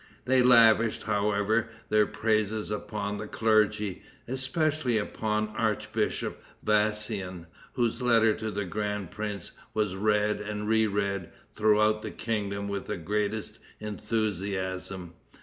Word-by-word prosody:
They 130 0 +4
lavished, 115 -2 +5
however, 105 +2 +1 0.2
their 105 -1 +4
praises 110 -1 0
upon 105 -1 -3
the 105 - -5
clergy, 105 -3 +2 0.3
especially 135 0 0
upon 110 0 -1
the - - -6
Archbishop 110 -2 -1 0.2
Vassian, 105 -4 0 0.3
whose 120 -1 0
letter 115 -3 +4
to 110 - -4
the 105 -1 -2
grand 105 -1 -3
prince 105 -3 -5 0.2
was 105 -3 0
read 105 +1 +1
and 105 0 -4
re 110 0 +4
read 100 -3 -1 0.3
throughout 110 0 +3
the - - -5
kingdom 100 -3 -2
with 100 -1 -4
the - - -2
greatest 105 +4 -2 0.2
enthusiasm. 95 -4 -3
105 Hz, 120 wpm, -28 LUFS, 100-110 Hz, 0.3 s, lavished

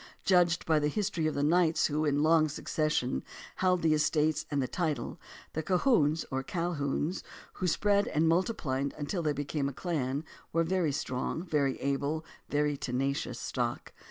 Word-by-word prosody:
Judged 175 -3 +3
by 160 -1 +3
the 150 - +1
history 180 -2 -1
of 155 - -2
the 145 - 0
knights 165 +1 +3
who 150 +1 0
in 145 0 +2
long 155 -1 +4
succession 150 - -1 0.3
held 180 -2 +2
the 160 -1 +4
estates 155 0 +1
and 145 - 0
the 130 - 0
title, 155 -7 -2 0.3
the 160 - -1
Colquhouns 165 - +2
or 135 0 0
Calhouns, 165 0 -1 0.3
who 185 - -2
spread 205 +3 +2
and 155 +2 +2
multiplied 160 - 0
until 155 +5 -2
they 150 -2 +1
became 145 0 -2
a - - -8
clan, 145 -3 -2 0.3
were 165 - +2
a - - +1
very 175 -3 +1
strong, 140 +2 -2
very 145 -6 0
able, 140 +3 -1 0.2
very 150 0 +1
tenacious 135 +1 -2
stock. - - -3
155 Hz, 165 wpm, -30 LUFS, 145-170 Hz, 0.3 s, long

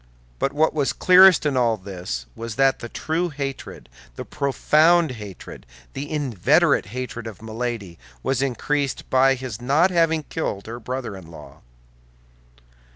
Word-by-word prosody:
But 135 - 0
what 155 +3 +1
was 145 -3 0
clearest 185 -2 +6
in 145 -2 +1
all 120 -3 +2
this 90 - -6
was 115 -1 -6
that 135 +1 +3
the 120 - -7
true 165 +7 -2
hatred, 135 - -6 0.3
the - - -7
profound 155 +3 +2
hatred, 105 -6 -10 0.3
the 145 +1 -6
inveterate 145 - +2
hatred 120 0 -6
of 110 -4 -9
Milady, 110 -5 -5 0.2
was 135 0 0
increased 140 +1 -2
by 135 +1 +4
his 125 -3 -7
not 150 +9 +3
having 165 -2 +2
killed 105 -11 -4
her 115 +2 -7
brother 125 -3 -5
in 90 -4 -12
law. 85 - -13
130 Hz, 145 wpm, -22 LUFS, 110-150 Hz, 0.3 s, clearest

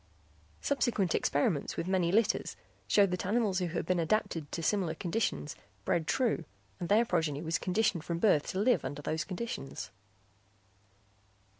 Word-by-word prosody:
Subsequent 240 - +1
experiments 145 +1 0
with 170 - -2
many 185 -3 +2
litters 215 +2 +1 0.3
showed 200 -3 +4
that 180 - -2
animals 205 -1 +1
who 180 - 0
had 170 - -3
been 180 -1 +1
adapted 165 -4 0
to 165 - -4
similar 180 -3 +1
conditions 165 - -2 0.3
bred 160 -2 +1
true 245 -9 +1 0.4
and 175 - -4
their 220 +3 +5
progeny 160 -7 0
was 165 0 0
conditioned 185 -3 +1
from 170 0 -2
birth 170 -5 +3
to - - -3
live 210 - +3
under 145 +2 -5
those 155 +2 -1
conditions. 185 - -5
180 Hz, 150 wpm, -31 LUFS, 160-210 Hz, 0.4 s, their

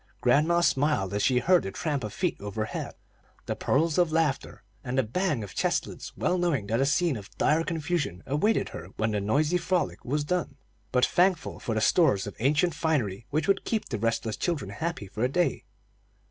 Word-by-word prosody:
Grandma 170 +4 +3
smiled 145 - +1
as 105 - 0
she 125 +3 +3
heard 180 +7 +4
the - - -4
tramp 145 - -2
of 105 - -4
feet 180 - -1
overhead, 110 +2 -4 0.5
the - - -2
peals 160 +4 +1
of 175 -3 +3
laughter, 155 -8 -1 0.2
and 130 0 -3
the 130 - +4
bang 145 - -1
of 100 - -8
chest - - +1
lids, - - -9
well 180 - +1
knowing 160 -12 0
that 115 +4 0
a 135 - +2
scene 160 +1 +2
of 100 -3 -8
dire 155 +2 +3
confusion 160 - -2
awaited 160 +11 +1
her - - -8
when 110 0 0
the 105 -1 -1
noisy 150 - +2
frolic 180 -1 -1
was 145 +4 -1
done, 180 +4 -2 0.4
but 125 -1 +4
thankful 180 -3 +1
for 115 - -3
the 110 - +1
stores 135 - +3
of 100 - -7
ancient 145 +7 +2
finery 125 - -1
which 155 +5 -1
would 195 0 +2
keep 220 -2 -2
the 110 - -3
restless 115 0 -1
children 145 - -2
happy 160 +1 -4
for 105 +4 -4
a 125 - +2
day. 175 +5 0
145 Hz, 200 wpm, -27 LUFS, 110-170 Hz, 0.5 s, heard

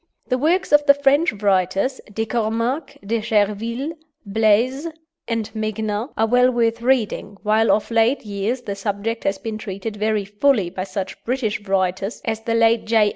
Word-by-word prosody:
The 255 - +2
works 350 +7 +1
of 295 0 +6
the 280 - +8
French 285 +4 +3
writers, 195 +4 0
De 220 +2 -2
Cominck, 230 +6 -2
De 225 +2 -1
Cherville, 225 +6 0 0.3
Blaze, 225 +8 +2 0.4
and 230 -2 -2
Megnin, 215 +1 -2
are 220 - +3
well 250 +2 +4
worth 230 -2 0
reading, 235 -5 0
while 220 +1 +3
of 215 - 0
late 230 +3 +2
years 210 +5 -2
the 200 - -3
subject 205 +3 -3
has 195 0 +1
been 220 -2 -5
treated 200 +2 -5
very 215 -1 0
fully 210 -2 +1
by 185 0 -4
such 190 0 -5
British 235 -4 -1
writers 190 +2 -1
as 225 -1 -2
the 230 0 -1
late 230 0 +3
J. 220 -2 +4
220 Hz, 165 wpm, -21 LUFS, 205-240 Hz, 0.4 s, the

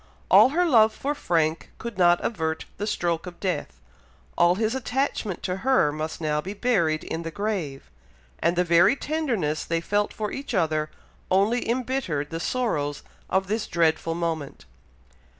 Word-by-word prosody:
All - - +8
her 350 +6 +2
love 225 -8 +5
for 285 +2 -2
Frank 165 - 0
could 235 -1 -6
not 175 -1 +4
avert 160 -7 -2
the 210 - -3
stroke 175 -5 -1
of 175 -1 -9
death, 185 - -3 0.6
all 175 +1 +4
his 220 +3 0
attachment 260 -6 -2
to 180 0 -2
her 255 - +3
must 155 +1 -4
now 150 -2 0
be 195 +5 -6
buried 175 -10 +1
in 165 - -4
the 165 - -4
grave, 175 -8 -4 0.5
and 170 - +1
the 180 - +3
very 175 +8 +5
tenderness 245 - -1
they 165 0 -1
felt 205 +5 0
for 210 -1 -4
each 280 +1 -5
other, 155 -3 +1 0.4
only 210 +6 +2
embittered 235 - -1
the 165 - -3
sorrows 150 - -1 0.3
of 190 0 +1
this 215 +3 -2
dreadful 165 -1 +1
moment. 160 - -4
180 Hz, 160 wpm, -25 LUFS, 160-225 Hz, 0.6 s, All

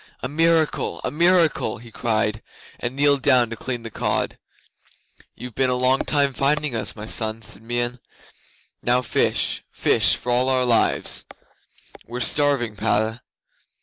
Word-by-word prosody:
"A - - 0
miracle! 160 +2 +1
A - - -2
miracle!" 170 -3 +2
he 115 -1 -14
cried, 110 -2 -1 0.4
and 125 - -4
kneeled 140 0 +3
down 125 -2 +4
to - - -3
clean 120 +1 -5
the 115 - -7
cod. - - -2 1.0
'"You've 125 -1 -9
been 130 +2 +1
a 125 - +1
long 130 +1 +2
time 140 -2 +1
finding 145 0 +1
us, 105 -3 -2
my 105 -1 -7
son," 110 0 -1
said 100 -1 -8
Meon. 120 +2 -2 0.8
"Now 125 +1 +2
fish - - 0
fish - - +3
for 125 - -4
all 125 +2 +2
our 130 -1 +2
lives. 120 -2 +1 0.8
We're 120 +1 -6
starving, 130 -4 +1
Padda." 110 +4 0
125 Hz, 150 wpm, -22 LUFS, 115-140 Hz, 1.0 s, down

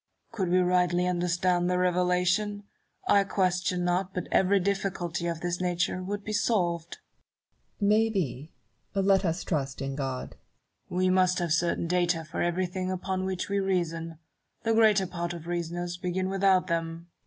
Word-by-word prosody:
Could 195 -6 -2
we 180 - +3
rightly 180 -1 +2
understand 180 0 +1
the 180 - +1
Revelation, 180 +3 +1 0.4
I 200 - +5
question 180 -2 0
not 180 +2 0
but 180 - -3
every 195 +1 +4
difficulty 185 -3 -2
of 165 -1 -3
this 175 0 -2
nature 180 0 0
would 200 +2 -4
be 215 - -4
solved. 175 -7 0 0.8
Barrow. 200 - +1
May 220 +1 +4
be: 155 - -3 0.4
let 195 0 +3
us 165 0 -1
trust 135 -5 -2
in 135 0 -3
God. 135 -2 -4 0.5
Newton. - - -4
"We 185 0 +3
must 185 -1 +3
have 170 -3 0
certain 170 +1 +1
data 175 -1 +1
for 155 - -4
everything 185 +1 -1
upon 185 0 -2
which 190 -1 -2
we 200 0 0
reason: 165 -4 -1 0.5
the 225 0 +2
greater 215 -3 +5
part 175 -1 -4
of 170 -2 -8
reasoners 175 0 -3
begin 185 +1 -2
without 195 -1 +3
them. 165 0 -3
180 Hz, 160 wpm, -28 LUFS, 170-190 Hz, 0.8 s, I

